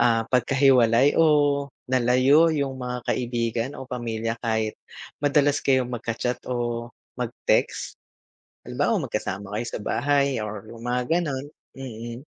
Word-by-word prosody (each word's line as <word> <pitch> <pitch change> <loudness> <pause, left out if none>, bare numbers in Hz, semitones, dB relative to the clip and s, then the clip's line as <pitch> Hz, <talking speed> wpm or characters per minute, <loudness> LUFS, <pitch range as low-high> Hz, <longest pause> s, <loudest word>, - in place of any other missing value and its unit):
ah, 115 -1 +3
pagkahiwalay 130 0 +4
o 145 -3 +3 0.2
nalayo 130 +6 +4
yung 140 -4 -1
mga 125 0 -3
kaibigan 120 0 -2
o 130 - -7
pamilya 115 -2 -3
kahit 110 -2 0 0.5
madalas 145 0 +3
kayong 130 -2 +2
magka-chat 120 +1 -3
o 120 -1 -2 0.3
mag-text? - - -1 0.7
Halimbawa - - 0
magkasama 100 0 -4
kayo 120 - -2
sa - - -5
bahay 140 -1 +1
or 105 -1 -5
yung 115 - -11
mga 125 +1 0 0.2
ganun, 140 -5 -3 0.3
mm. 120 0 -7
125 Hz, 120 wpm, -24 LUFS, 115-135 Hz, 0.7 s, pagkahiwalay